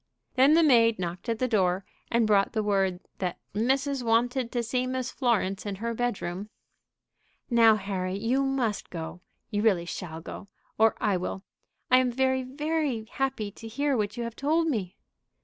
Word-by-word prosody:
Then 275 +4 +5
the 335 - +5
maid 230 -6 +5
knocked 180 +5 -5
at 230 - 0
the 255 - 0
door, 190 -4 +1 0.2
and 235 -1 +3
brought 205 +1 +2
word 195 -4 +1 0.2
"that 180 -2 -2 0.2
missus 265 +5 0
wanted 240 +2 +1
to 240 -1 -1
see 250 +2 -1
Miss 255 -1 -2
Florence 210 -7 0
in 205 -2 -4
her 230 +4 -3
bedroom." 210 -5 -3 1.0
"Now, 230 -2 +6
Harry, 190 -2 -3
you 245 +6 +1
must 260 -6 -1
go. 165 +1 -6 0.3
You 205 -1 0
really 195 -6 +3
shall 165 -2 -6
go, 170 - -9 0.3
or 220 0 +5
I 200 -3 +1
will. 185 +2 -4 0.5
I 255 - +8
am 255 -1 +1
very, 260 +1 +1
very 285 -2 -2
happy 265 -6 -2
to 225 +3 -10
hear 280 +5 0
what 210 0 -1
you 240 - -2
have 230 -1 -5
told 315 +4 +1
me." 205 - -3
230 Hz, 170 wpm, -27 LUFS, 195-255 Hz, 1.0 s, I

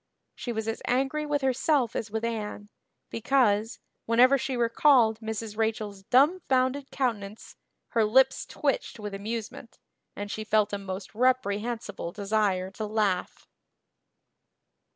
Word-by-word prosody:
She 245 - -5
was 220 -1 -3
as 225 - -3
angry 270 +4 0
with 290 -1 -1
herself 265 -1 +1
as 225 - -3
with 220 +2 -3
Anne, 210 -2 -4 0.4
because, 225 -3 +1 0.3
whenever 245 +4 +6
she 265 -1 -2
recalled 235 -1 +4
Mrs. 220 -1 -5
Rachel's 215 -2 -2
dumbfounded 270 - +2
countenance 220 -5 -3 0.3
her 230 - +2
lips 260 +5 +3
twitched - - -2
with 210 -1 -6
amusement 220 +2 -6 0.4
and 205 0 -5
she 215 - -4
felt 210 -1 +1
a 205 - -1
most 195 +1 -7
reprehensible 235 -5 -1
desire 200 -2 0
to 215 +2 -5
laugh. 205 -4 -1
225 Hz, 125 wpm, -27 LUFS, 210-255 Hz, 0.4 s, whenever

